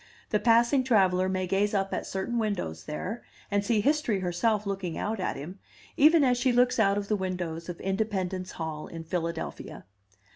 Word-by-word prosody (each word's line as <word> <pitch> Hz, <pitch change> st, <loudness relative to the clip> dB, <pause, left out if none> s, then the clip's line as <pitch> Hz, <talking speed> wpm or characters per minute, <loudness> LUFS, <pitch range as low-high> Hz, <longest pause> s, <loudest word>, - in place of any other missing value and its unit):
The 210 Hz, -, +3 dB
passing 240 Hz, +4 st, +4 dB
traveller 190 Hz, -6 st, +3 dB
may 185 Hz, 0 st, -1 dB
gaze 200 Hz, +3 st, +1 dB
up 195 Hz, 0 st, 0 dB
at -, -, -3 dB
certain 215 Hz, +5 st, -2 dB
windows 180 Hz, -, -3 dB
there, 185 Hz, +9 st, -4 dB, 0.3 s
and 205 Hz, 0 st, +2 dB
see 210 Hz, 0 st, +2 dB
History 275 Hz, -6 st, +1 dB
herself 205 Hz, +4 st, 0 dB
looking 195 Hz, -4 st, -3 dB
out 220 Hz, 0 st, -2 dB
at 185 Hz, -, -1 dB
him, 175 Hz, +8 st, -8 dB, 0.4 s
even 310 Hz, +1 st, +6 dB
as 250 Hz, -2 st, +3 dB
she 255 Hz, 0 st, +3 dB
looks 245 Hz, 0 st, +3 dB
out 200 Hz, -2 st, +3 dB
of 205 Hz, -1 st, -3 dB
the 215 Hz, -, +1 dB
windows 180 Hz, -3 st, -4 dB
of 175 Hz, -, -6 dB
Independence 190 Hz, -2 st, -2 dB
Hall 160 Hz, -2 st, -5 dB
in 165 Hz, -1 st, -8 dB
Philadelphia. 165 Hz, 0 st, -4 dB
195 Hz, 180 wpm, -28 LUFS, 180-225 Hz, 0.4 s, even